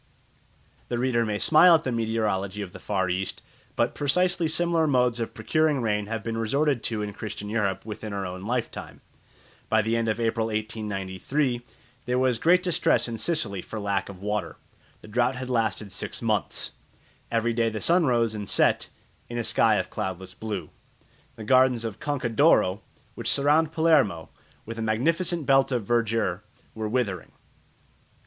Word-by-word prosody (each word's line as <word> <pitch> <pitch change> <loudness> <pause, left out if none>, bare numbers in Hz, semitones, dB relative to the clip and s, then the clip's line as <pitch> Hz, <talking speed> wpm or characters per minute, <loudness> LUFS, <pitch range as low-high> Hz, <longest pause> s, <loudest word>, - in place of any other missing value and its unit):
The 120 - -2
reader 120 -1 +1
may 105 -1 -1
smile 165 +8 +6
at 160 - 0
the 130 - -2
meteorology 110 -4 -1
of 95 - -9
the - - -9
Far 95 -2 -1
East; 95 +2 -3 0.3
but - - +1
precisely 175 +4 +2
similar 165 0 +2
modes 125 -4 +2
of 115 - -4
procuring 155 -3 +1
rain 105 -3 -1
have 110 -1 -4
been 115 0 -3
resorted 140 +3 +1
to 110 -2 -1
in 105 -1 -5
Christian 105 -1 -6
Europe 105 -4 -1
within 110 0 -6
our 100 -1 -3
own 90 0 -6
lifetime. 120 +4 -4 0.7
By 110 -1 +3
the 110 +2 0
end 115 -1 0
of 110 +1 -1
April 115 -1 0
1893 110 +4 -2 0.4
there 125 +1 0
was 125 -3 +2
great 180 +5 +4
distress 180 -8 +2
in 115 -1 -5
Sicily 110 - -1
for 110 - -7
lack 100 -1 -1
of 95 -1 -10
water. 105 0 -2 0.4
The - - -13
drought 120 +4 +1
had 130 0 -5
lasted 110 -3 0
six - - -4
months. - - -1 0.6
Every 115 0 +1
day 115 0 +1
the 110 -1 -4
sun 170 +3 +3
rose 115 -3 +2
and 105 -2 -5
set - - +2 0.4
in 120 - -5
a 120 - -1
sky 110 0 +3
of 95 -2 -2
cloudless 95 -2 -4
blue. 100 -6 -5 0.6
The 110 - -8
gardens 130 0 +3
of 110 -3 -5
the - - -12
Conca 145 -5 -1
d'Oro, 110 - +3 0.3
which - - -3
surround 150 +3 +3
Palermo 155 - +2 0.4
with 115 +1 -7
a - - -2
magnificent 160 +9 0
belt 135 0 +4
of 120 -5 -1
verdure, 115 -5 0 0.3
were 110 -1 -4
withering. 105 -7 -2
115 Hz, 170 wpm, -26 LUFS, 105-130 Hz, 0.7 s, smile